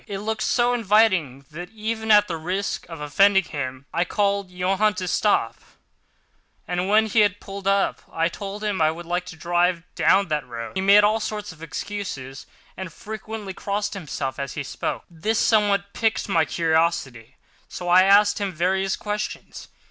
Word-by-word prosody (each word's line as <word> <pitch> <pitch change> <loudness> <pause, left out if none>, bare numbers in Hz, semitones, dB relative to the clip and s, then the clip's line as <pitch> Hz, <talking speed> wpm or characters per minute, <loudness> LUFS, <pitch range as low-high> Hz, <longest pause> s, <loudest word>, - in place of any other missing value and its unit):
It 200 -2 -4
looked 215 +2 -3
so 245 0 +2
inviting 190 - +2
that, 175 +3 -8
even 220 +1 -4
at 210 -1 +6
the 170 - -3
risk 185 +5 -3
of 165 -2 -8
offending 195 +7 +4
him, 130 -4 -6
I 170 - +2
called 200 0 0
Johann 190 +3 +1
to 185 0 -4
stop—and 180 - -4
when 215 +1 +5
he 220 +1 +1
had 205 -1 +3
pulled 195 -1 -8
up, 195 0 +1
I 165 0 +1
told 200 +4 -7
him 205 -5 -1
I 155 - +5
would 170 +2 -6
like 175 +1 -2
to 170 - -8
drive 175 +1 +1
down 195 -2 +3
that 150 -4 -2
road. 115 -1 -6
He 190 - 0
made 200 +2 +6
all 215 +2 +3
sorts 210 -1 -4
of 160 -1 -16
excuses, 160 -6 -6 0.3
and 190 -2 -7
frequently 215 0 -7
crossed 205 +2 -3
himself 145 -7 -5
as 140 -1 -4
he 150 - -4
spoke. - - -4
This 205 +7 -2
somewhat 200 -3 +2
piqued 225 -1 0
my 165 -5 +2
curiosity, 160 -7 -1 0.3
so 175 - -7
I 180 +1 +7
asked 200 +3 +5
him 200 -1 -1
various 190 +3 0
questions. 210 0 -5
190 Hz, 170 wpm, -23 LUFS, 165-210 Hz, 0.3 s, I